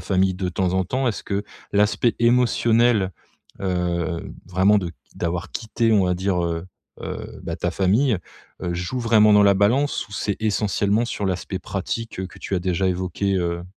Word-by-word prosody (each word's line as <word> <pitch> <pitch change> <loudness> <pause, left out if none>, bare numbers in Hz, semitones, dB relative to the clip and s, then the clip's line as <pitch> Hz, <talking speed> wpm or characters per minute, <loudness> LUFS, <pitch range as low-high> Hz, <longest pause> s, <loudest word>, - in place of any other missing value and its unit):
famille 95 -1 +1
de 90 -1 -2
temps 90 0 0
en 95 0 +2
temps? 130 +6 0
Est-ce 110 - -4
que 100 0 -1 0.3
l'aspect 105 +3 +2
émotionnel 120 -3 +3 0.5
heu, 90 -2 -1 0.2
vraiment 95 +3 +4
de 90 -3 -4 0.2
d'avoir 90 +1 -3
quitté, 115 0 -1
on 100 -4 +4
va 90 - +1
dire, 95 0 0
heu 85 0 -2 0.4
heu, - - -6
bah - - -4
ta - - -1
famille, 105 +5 +2 0.5
heu, 85 - -1
joue 90 +9 -3
vraiment 110 -3 +5
dans 105 - +7
la 100 0 +6
balance 110 +5 +1
ou 100 - -15
c'est 100 -1 -1
essentiellement 105 +1 +1
sur 105 -4 -3
l'aspect 95 0 -2
pratique 95 +1 -4
que 90 - -14
tu 100 - -4
as - - +2
déjà 90 +1 0
évoqué, 95 +2 -1
heu? 85 0 -2
95 Hz, 175 wpm, -23 LUFS, 90-110 Hz, 0.5 s, dans